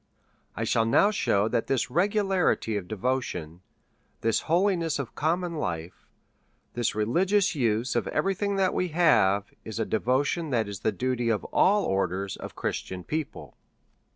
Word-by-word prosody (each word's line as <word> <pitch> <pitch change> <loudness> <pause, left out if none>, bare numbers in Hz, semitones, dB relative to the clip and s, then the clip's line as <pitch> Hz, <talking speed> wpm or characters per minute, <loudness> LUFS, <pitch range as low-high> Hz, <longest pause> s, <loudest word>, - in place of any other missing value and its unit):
I 115 - -2
shall 115 0 +1
now 200 - +4
shew 105 - +1
that 115 - -1
this 130 -2 0
regularity 190 - +1
of 100 -3 -3
devotion, 105 -7 -3 0.6
this 115 -1 +2
holiness 170 -2 +2
of 140 -5 -5
common 170 +3 -1
life, 90 - -5 0.7
this 120 -3 -1
religious 180 - +2
use 120 -4 0
of 120 - 0
every 195 - 0
thing 200 +1 -1
that 190 -1 +2
we 185 - 0
have, 125 - +3
is 110 -1 -7
a 110 - 0
devotion 135 +8 0
that 115 -5 0
is 100 -1 -6
the 110 - 0
duty 125 -1 -1
of 110 -2 0
all 205 +2 +4
orders 95 0 -1
of - - -9
Christian 95 -1 -4
people. 155 - -5
125 Hz, 155 wpm, -27 LUFS, 105-175 Hz, 0.7 s, now